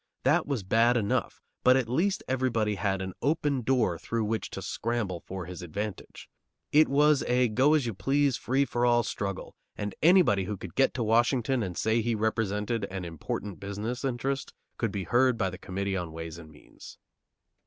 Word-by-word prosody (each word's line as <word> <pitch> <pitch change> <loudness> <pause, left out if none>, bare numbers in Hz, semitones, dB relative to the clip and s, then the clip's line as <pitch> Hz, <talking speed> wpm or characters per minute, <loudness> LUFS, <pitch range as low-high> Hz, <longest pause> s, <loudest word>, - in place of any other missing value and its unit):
That - - +3
was 135 -8 -2
bad 115 +5 +3
enough, 105 -3 -1 0.2
but 130 +1 +6
at 130 -3 0
least 175 - 0
everybody 120 -5 0
had 95 -1 -1
an 95 0 -5
open 145 -2 +1
door 115 -9 +1
through 115 -1 -2
which 110 +1 -2
to 95 - -6
scramble 110 -3 -2
for 95 0 -7
his 90 +2 -8
advantage. 100 +4 -6 0.4
It 155 +1 +6
was 145 +1 +4
a 125 0 +3
go 130 +8 +4
as 145 -5 +1
you 115 - -2
please, 135 +6 +1
free 135 +4 +1
for 120 -1 -2
all 120 -1 +4
struggle, 100 -2 -4 0.2
and 105 -1 -3
anybody 160 - +5
who 105 +2 -4
could - - -9
get 135 - +2
to 125 - -1
Washington 120 +3 +2
and 90 -4 -4
say 110 +1 +2
he 115 +1 0
represented 110 0 -1
an 95 -2 -6
important 85 +4 -5
business 105 +6 -4
interest 135 +1 -2 0.2
could 115 -3 0
be 100 -2 -3
heard 125 +3 +3
by 95 -3 0
the 90 - -9
Committee 100 +1 -3
on 90 -3 -3
Ways 80 +1 -7
and 80 -2 -12
Means. 75 - -14
115 Hz, 185 wpm, -28 LUFS, 100-130 Hz, 0.4 s, but